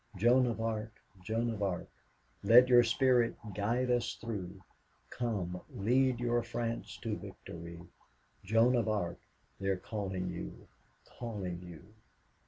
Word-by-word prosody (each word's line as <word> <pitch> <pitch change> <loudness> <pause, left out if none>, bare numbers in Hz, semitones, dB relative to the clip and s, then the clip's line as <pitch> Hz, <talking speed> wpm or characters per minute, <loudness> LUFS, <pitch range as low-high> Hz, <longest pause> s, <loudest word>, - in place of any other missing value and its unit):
Joan 120 +6 +4
of 115 -2 -2
Arc, 110 -1 -2 0.3
Joan 115 +4 0
of 110 -2 -5
Arc, 95 -3 -1 0.5
Let 125 +2 +7
your 120 -1 +8
spirit 120 0 +3 0.2
guide 120 +6 0
us 120 -1 +1
through, 100 -5 -5 0.5
Come, 95 -7 -2
lead 125 +4 +2
your 120 0 +1
France 115 0 -4
to - - -1
victory. 85 0 -9 0.6
Joan 115 +5 +4
of 115 -3 +1
Arc, 95 -5 -1 0.4
they 95 - -3
are 95 -1 +2
calling 95 -2 -3
you, 85 - -7 0.4
calling 100 -7 -5
you." 90 +3 -12
110 Hz, 130 wpm, -33 LUFS, 95-120 Hz, 0.6 s, your